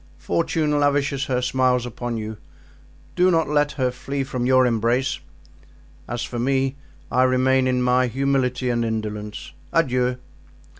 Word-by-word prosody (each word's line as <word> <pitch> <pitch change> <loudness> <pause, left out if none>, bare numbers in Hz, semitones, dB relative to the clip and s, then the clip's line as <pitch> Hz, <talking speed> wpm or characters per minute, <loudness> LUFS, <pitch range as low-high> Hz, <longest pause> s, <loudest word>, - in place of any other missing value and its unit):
Fortune 155 -3 0
lavishes 140 -1 +1
her 125 -1 -1
smiles 125 -1 +2
upon 120 -1 -4
you; 110 0 -5 0.8
do 180 +1 +4
not 165 -3 +2
let 145 0 +1
her 130 -3 0
flee 135 +2 -4
from 125 -2 -2
your 130 0 +5
embrace. 120 +3 +1 0.9
As 120 0 -3
for 120 - -5
me, 135 +2 +1 0.4
I 125 - +3
remain 130 0 +3
in 125 -1 +1
my 125 0 +3
humility 130 0 0
and 120 -1 0
indolence. 105 -2 -4 0.2
Adieu!" 125 -5 +1
130 Hz, 140 wpm, -23 LUFS, 120-135 Hz, 0.9 s, your